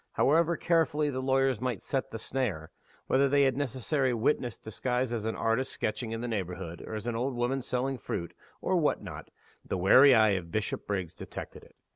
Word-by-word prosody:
However 165 +3 +3
carefully 160 -3 +1
the 130 -1 -3
lawyers 135 -3 +2
might 125 -6 -1
set 135 -2 -2
the 115 - -5
snare 110 -11 -3 0.3
whether 135 +1 +3
they 140 0 +4
had 135 -1 +3
their 135 - -4
necessary 130 0 0
"witness" 120 -1 0
disguised 125 +3 -2
as 110 -2 -3
an 110 - -1
artist 115 +4 0
sketching 110 +1 -3
in 115 0 -3
the 120 - -3
neighborhood, 90 -5 -4
or 110 - -6
as 110 - -5
an 120 -1 -2
old 125 +3 -1
woman 125 +3 0
selling 130 +1 -2
fruit, 85 -5 -4 0.3
or - - +1
what - - +1
not - - -8 0.3
the - - -3
wary 130 +9 +7
eye 110 -1 +5
of 90 -3 -2
Bishopriggs 100 -3 -3
detected - - -8
it. - - -19
125 Hz, 195 wpm, -29 LUFS, 110-135 Hz, 0.3 s, wary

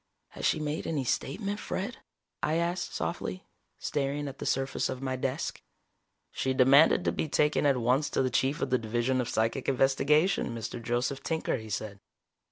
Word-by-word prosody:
"Has - - -2
she - - +2
made 150 +1 -3
any 150 -4 -1
statement, 200 - -2
Fred?" 200 +6 -4 0.4
I 155 - +1
asked 170 +1 -1
softly, 185 +2 -3 0.3
staring 145 0 -2
at 135 0 -8
the - - -4
surface 135 0 0
of 130 - -4
my 130 -1 -2
desk. 130 0 -3 0.7
"She 130 0 -1
demanded 140 +7 +6
to - - +3
be 155 - -2
taken 150 0 +2
at 140 -2 +3
once 125 +5 +2
to - - +1
the 130 - 0
Chief 135 +4 +1
of 130 - -2
the 130 - +3
Division 120 +3 0
of 120 - -4
Psychic 115 +5 0
Investigation, 135 +4 +2
Mr. 115 +1 -5
Joseph 120 +3 -1
Tinker," 160 -4 -1
he 110 -2 -9
said. 105 -1 -4
135 Hz, 175 wpm, -29 LUFS, 125-150 Hz, 0.7 s, demanded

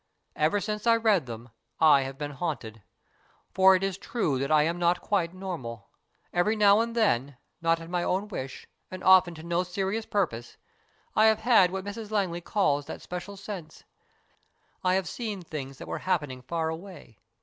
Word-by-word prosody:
Ever 155 +7 +2
since 210 +2 -4
I 230 - +6
read 215 - +2
them 115 +1 -8 0.3
I 150 -3 +6
have 135 0 -5
been 145 0 -4
haunted. 135 -8 -5 0.7
For 190 0 +6
it 185 - -1
is 195 -1 -2
true 160 - -1
that 140 +1 -2
I 155 -1 +5
am 170 +3 -1
not 175 +1 +2
quite 180 -5 0
normal. 160 - -7 0.4
Every 190 +5 +2
now 205 -1 +5
and 230 +1 -1
then, 140 - +1 0.2
not 165 0 +2
at 165 - -9
my 175 +1 -1
own 190 +4 -1
wish, 135 -10 -6 0.2
and 185 0 -8
often 185 -2 +6
to 160 - -10
no 170 +1 0
serious 195 +4 -3
purpose, 140 - -2 0.6
I 215 - +5
have 220 -1 +3
had 220 -6 +5
what 190 +1 -5
Mrs 210 +1 -6
Langley 190 -5 -1
calls 145 -8 0
that - - -7
special 180 +3 -7
sense. 190 -6 -8 1.0
I 185 0 +3
have 190 -1 0
seen 215 -6 -5
things 135 -5 -7
that - - -9
were - - -4
happening 150 -9 -2
far 160 +5 -2
away. 160 - -9
180 Hz, 185 wpm, -27 LUFS, 150-200 Hz, 1.0 s, I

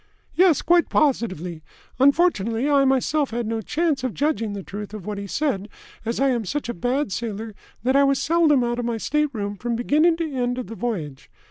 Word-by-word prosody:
"Yes. 350 -5 +4
Quite 345 0 +3
positively. 185 - 0 0.4
Unfortunately 270 - +3
I 280 -2 +4
myself 270 +2 +1
had 235 +1 -3
no 225 0 -2
chance 300 +1 -1
of 255 -4 -2
judging 280 -8 0
the 200 -1 -6
truth 205 +2 -7
of 200 -4 -8
what 210 -1 -4
he 200 - -6
said, 210 -5 -1 0.4
as 230 +1 -2
I 275 0 +3
am 240 -3 0
such 275 +7 -3
a - - -1
bad 245 +5 -1
sailor 220 0 -4 0.3
that 260 +2 +2
I 280 - +6
was 275 -1 +3
seldom 310 -5 +3
out 240 0 -1
of 240 - -2
my 235 -1 -1
stateroom 225 -7 -1
from 235 +3 -2
beginning 305 +8 +3
to 325 -3 -3
end 245 -1 -1
of 255 - -3
the 225 - -8
voyage. 180 - -4
245 Hz, 205 wpm, -23 LUFS, 215-290 Hz, 0.4 s, I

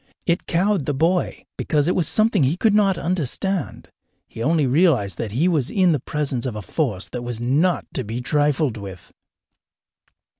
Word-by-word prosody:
It 170 0 0
cowed 185 -2 +1
the 145 - 0
boy, 170 +5 0
because 150 -1 0
it 180 - +2
was 170 -5 +1
something 215 -3 +2
he 140 +5 +2
could 215 +2 +2
not 200 -3 +3
understand. 175 +1 -2 0.4
He 115 - -9
only 155 +3 +2
realized 130 - +2
that 105 -3 -4
he 150 +10 +2
was 155 -8 +1
in 185 -3 +3
the 150 - +1
presence 135 -2 -3
of 120 - -4
a 105 - -6
force 105 - -2
that 125 - -5
was 120 -2 -5
not 145 +9 +1
to 130 - -2
be 115 +3 -5
trifled 145 -1 +1
with. 95 -3 -10
150 Hz, 180 wpm, -22 LUFS, 120-175 Hz, 0.4 s, not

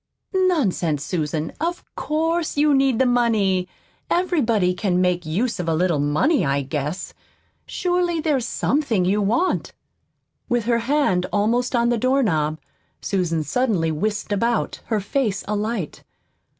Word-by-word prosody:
"Nonsense, 235 - +1
Susan, 155 -2 -2
of 345 +2 -2
COURSE 325 +1 -1
you 295 0 +4
need 270 -3 +3
the 260 - +3
money. 220 -7 +2 0.4
Everybody 235 - +1
can 180 -1 0
make 180 -2 0
use 220 +9 -1
of 170 -2 -2
a 160 - +1
little 170 -2 +1
money, 155 - +2
I 140 -1 0
guess. 150 +5 -4 0.5
Surely, 355 -2 0
there's 285 -6 0
SOMETHING 245 -10 0
you 200 +3 +2
want." 235 - 0 0.8
With 240 -3 0
her 235 0 +2
hand 230 -8 +1
almost 235 +5 +1
on 235 0 +2
the 240 -1 +1
doorknob 205 - +1 0.4
Susan 170 -5 -1
suddenly 185 - 0
whisked 210 +7 -2
about, 230 +3 0
her 220 -2 0
face 205 -1 -1
alight. 210 -4 -3
215 Hz, 135 wpm, -22 LUFS, 180-270 Hz, 0.8 s, you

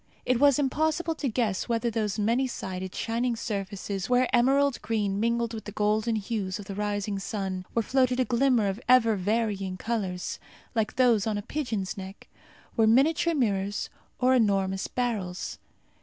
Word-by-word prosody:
It 250 -1 +2
was 280 -2 +5
impossible 315 +4 0
to 310 -3 -3
guess 220 -2 -1
whether 235 0 0
those 215 -2 -1
many 230 +5 +1
sided, 185 -5 -5
shining 235 +1 -1
surfaces, 200 -2 -4
where 250 0 +4
emerald 270 +2 +3
green 205 -3 -1
mingled 235 +1 0
with 220 -2 -6
the 210 - -6
golden 215 +2 +1
hues 200 -3 -2
of 205 - -9
the 195 - -6
rising 205 0 -2
sun 190 -2 -4
where 230 - +1
floated 255 +1 +2
a 255 - +3
glimmer 245 -2 +2
of 195 +4 -3
ever 230 -3 +6
varying 200 -1 -1
colours, 190 -5 -3 0.3
like 220 -3 -1
those 235 -4 +3
on 215 -1 0
a 205 - -4
pigeon's 220 -8 -3
neck, 190 +1 -9 0.5
were 225 -1 +4
miniature 305 +8 +3
mirrors 205 -6 -1 0.3
or 255 +1 +3
enormous 195 -5 +1
beryls. 210 -8 -3
225 Hz, 160 wpm, -27 LUFS, 200-250 Hz, 0.5 s, ever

